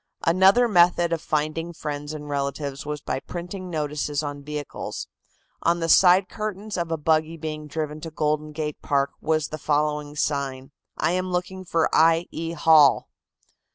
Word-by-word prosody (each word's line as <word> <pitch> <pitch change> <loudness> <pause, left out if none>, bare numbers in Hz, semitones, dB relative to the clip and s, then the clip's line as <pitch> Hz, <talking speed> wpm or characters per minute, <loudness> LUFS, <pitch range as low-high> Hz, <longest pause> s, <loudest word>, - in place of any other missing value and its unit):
Another 190 +8 +5
method 175 -3 +4
of 165 - -2
finding 155 +3 -2
friends 145 -2 -5
and 150 -1 -7
relatives 140 0 -3
was 150 -1 -4
by 130 - -3
printing 180 +4 -7
notices 150 -2 -2
on 145 -1 -5
vehicles. 150 0 -6 0.6
On 170 +1 +2
the 165 0 -2
side 185 +2 +6
curtains 215 0 -5
of 170 -2 -2
a 165 - 0
buggy 160 +1 +1
being 155 -1 -5
driven 150 0 -4
to 165 - -6
Golden 155 -1 -1
Gate 150 -1 -4
Park 140 -1 +1
was 155 -1 0
the 155 - -6
following 150 0 -1
sign: 140 -2 -2 0.3
"I - - +1
am 185 +1 -1
looking 185 +1 -3
for 165 -2 +1
I. 165 +1 +4
E. 165 +1 -4
Hall." 155 -3 +5
155 Hz, 160 wpm, -24 LUFS, 150-170 Hz, 0.6 s, side